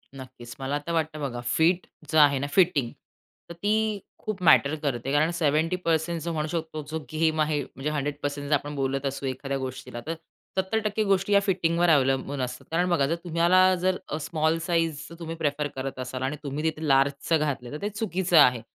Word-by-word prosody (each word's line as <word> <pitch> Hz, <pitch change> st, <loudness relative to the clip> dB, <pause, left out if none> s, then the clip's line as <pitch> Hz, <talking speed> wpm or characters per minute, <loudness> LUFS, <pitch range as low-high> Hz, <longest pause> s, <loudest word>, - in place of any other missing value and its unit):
नक्कीच. 130 Hz, -2 st, -10 dB
मला 135 Hz, +2 st, -1 dB
तर 170 Hz, -, -1 dB
वाटतं 155 Hz, -2 st, -1 dB
बघा 120 Hz, -3 st, -3 dB, 0.2 s
फिट 175 Hz, +3 st, +3 dB, 0.3 s
जे 160 Hz, -, +2 dB
आहे 145 Hz, -3 st, +6 dB
ना 140 Hz, -, -2 dB
फिटिंग. 160 Hz, -10 st, +3 dB, 0.6 s
तर -, -, -6 dB
ती 210 Hz, +4 st, 0 dB, 0.2 s
खूप 215 Hz, -3 st, -4 dB
मॅटर 155 Hz, -3 st, +5 dB
करते. 135 Hz, -2 st, -2 dB
कारण 150 Hz, +3 st, +3 dB
70% 165 Hz, +1 st, +1 dB
जो 170 Hz, +1 st, -3 dB
म्हणू 155 Hz, -1 st, -1 dB
शकतो 160 Hz, -1 st, -4 dB
की 145 Hz, -, -15 dB
जो 160 Hz, -, -2 dB
गेम 155 Hz, 0 st, +1 dB
आहे 150 Hz, -1 st, +1 dB
म्हणजे 135 Hz, +3 st, -5 dB
100% 145 Hz, -1 st, -3 dB
जर 150 Hz, -, +2 dB
आपण 145 Hz, +1 st, -4 dB
बोलत 135 Hz, 0 st, -1 dB
असू 140 Hz, 0 st, -3 dB
एखाद्या 135 Hz, +1 st, -3 dB
गोष्टीला. 130 Hz, -2 st, -6 dB
तर 165 Hz, -, -1 dB, 0.4 s
70% 215 Hz, +2 st, 0 dB
गोष्टी 195 Hz, +1 st, +2 dB
या 200 Hz, -, +7 dB
फिटिंगवर 175 Hz, -3 st, +1 dB
अवलंबून 135 Hz, -1 st, +2 dB
असतात. 125 Hz, 0 st, -5 dB
कारण 175 Hz, +2 st, +1 dB
बघा 170 Hz, -6 st, +3 dB
जर 165 Hz, -, 0 dB
तुम्हाला 175 Hz, +2 st, +4 dB, 0.2 s
जर 185 Hz, 0 st, +2 dB
अ, 150 Hz, -, -2 dB
स्मॉल 160 Hz, +1 st, 0 dB
साइझ 165 Hz, -1 st, +2 dB, 0.2 s
जर 170 Hz, -, -10 dB
तुम्ही 165 Hz, 0 st, -5 dB
प्रिफर 150 Hz, -2 st, -1 dB
करत 135 Hz, 0 st, -5 dB
असाल 130 Hz, 0 st, -5 dB
आणि 135 Hz, +3 st, -1 dB
तुम्ही 145 Hz, +1 st, -4 dB
तिथे 160 Hz, -1 st, -1 dB
लार्जचं 140 Hz, +3 st, +3 dB
घातलं, 135 Hz, -5 st, -2 dB
तर 150 Hz, -, -6 dB
ते 205 Hz, -, -1 dB
चुकीचं 190 Hz, -5 st, 0 dB
आहे. 125 Hz, -5 st, +6 dB
155 Hz, 195 wpm, -26 LUFS, 140-170 Hz, 0.6 s, या